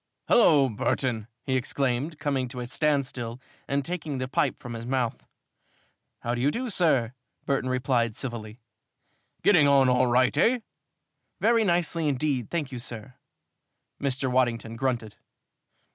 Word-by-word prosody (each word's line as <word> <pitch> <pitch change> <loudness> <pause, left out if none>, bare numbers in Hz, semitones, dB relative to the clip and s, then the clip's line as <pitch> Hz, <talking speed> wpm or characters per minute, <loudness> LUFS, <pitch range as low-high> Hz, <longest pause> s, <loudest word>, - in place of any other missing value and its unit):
"Hullo, 150 - +6
Burton!" 115 0 -1 0.2
he 130 - -1
exclaimed, 135 +3 -1
coming 140 -4 -1
to 125 +1 -7
a 120 - -4
standstill 130 -4 -1 0.3
and 140 0 -1
taking 160 -5 -3
the 130 0 -3
pipe 130 - 0
from 120 -2 -8
his 115 0 -6
mouth. 125 -3 -1 1.0
"How 120 - -2
do 120 - -2
you 140 - +3
do, 240 +8 -3
sir?" 135 - +2 0.3
Burton 135 -2 0
replied, 125 -3 0
civilly. 115 -3 -6 0.8
Getting 170 -8 +6
on 135 -2 +5
all 125 0 +3
right, 125 +1 +3
eh? 245 +1 +3 0.8
"Very 230 0 +3
nicely 170 -4 +1
indeed, 135 -3 -1
thank 155 -5 -2
you, 125 - -5
sir." 120 0 -8 0.9
Mr. 135 -2 -1
Waddington 115 -3 0
grunted. 115 -4 -2
130 Hz, 140 wpm, -26 LUFS, 120-145 Hz, 1.0 s, Hullo